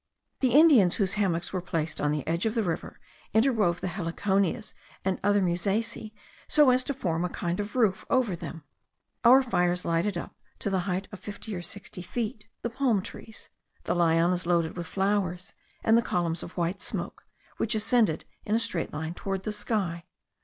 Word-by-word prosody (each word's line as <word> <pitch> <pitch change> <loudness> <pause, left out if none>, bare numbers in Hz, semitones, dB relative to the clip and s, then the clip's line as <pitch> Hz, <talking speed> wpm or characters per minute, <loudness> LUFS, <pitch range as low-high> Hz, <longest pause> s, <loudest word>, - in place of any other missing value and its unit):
The 255 -3 +2
Indians 275 - +7
whose 195 -4 0
hammocks 180 -5 0
were 185 - -1
placed 165 -3 -3
on 150 - +2
the 150 -2 -2
edge 170 +6 +1
of 220 - -2
the 225 - +2
river, 170 -3 -4 0.4
interwove 220 -8 +3
the - - -2
heliconias 190 +1 -1 0.3
and 190 -1 0
other 205 0 +3
musaceae, 210 +5 -1 0.4
so 295 -4 +5
as 255 0 +3
to 280 - -1
form 175 -9 -1
a 180 - -1
kind 175 +1 -3
of 205 +2 -4
roof 220 -7 +2
over 240 -8 +2
them. 165 -2 -8 0.6
Our 255 +3 +8
fires 180 -7 +1
lighted 170 +3 0
up, - - -6 0.2
to 200 - -2
the 190 - +2
height 185 +2 -1
of 205 - -8
fifty 210 +1 -7
or 175 - -4
sixty 195 +2 -8
feet, 220 +4 -4 0.2
the 235 - -1
palm 230 -6 +1
trees, 220 - -10 0.3
the - - 0
lianas 170 +1 +2
loaded 170 -2 +1
with 175 -2 -5
flowers, 190 -3 -1 0.3
and 225 - +5
the 230 - +5
columns 170 -5 -1
of 175 - -9
white 175 +2 -1
smoke, - - -4 0.3
which 225 0 0
ascended 215 -6 +2 0.2
in 210 - 0
a - - +5
straight 230 -7 +1
line 160 +2 -4
toward 195 +1 -4
the 215 - -2
sky. 200 -5 -2
190 Hz, 185 wpm, -28 LUFS, 175-220 Hz, 0.6 s, Our